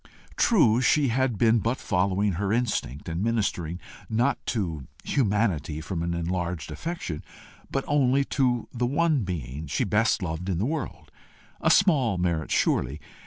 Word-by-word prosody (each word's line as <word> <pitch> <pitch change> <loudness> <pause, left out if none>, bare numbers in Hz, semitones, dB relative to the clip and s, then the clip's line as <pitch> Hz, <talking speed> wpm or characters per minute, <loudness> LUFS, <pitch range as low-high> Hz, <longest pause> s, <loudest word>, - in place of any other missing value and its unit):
True 125 - +4
she 140 +2 +3
had 125 -1 +1
been 115 +2 +4
but 115 +4 -1
following 95 +2 +1
her 95 +3 -1
instinct, 105 - -1
and 85 +1 -3
ministering 100 -7 -1 0.3
not 120 +5 +1
to 85 - -2 0.2
humanity 100 - 0
from 80 +2 -4
an 85 0 -1
enlarged 85 -2 -3
affection, 165 - -5 0.5
but 135 - -2
only 140 -1 +3
to 125 -5 0
the 120 0 0
one 155 +1 +2
being 75 -5 -5
she 70 - 0
best 105 -1 +2
loved 85 +2 -3
in 90 - 0
the 100 - 0
world 150 -2 -4 0.5
a - - +3
small 140 - +4
merit 85 -3 -1
surely! 65 +4 +1
105 Hz, 150 wpm, -26 LUFS, 85-125 Hz, 0.5 s, True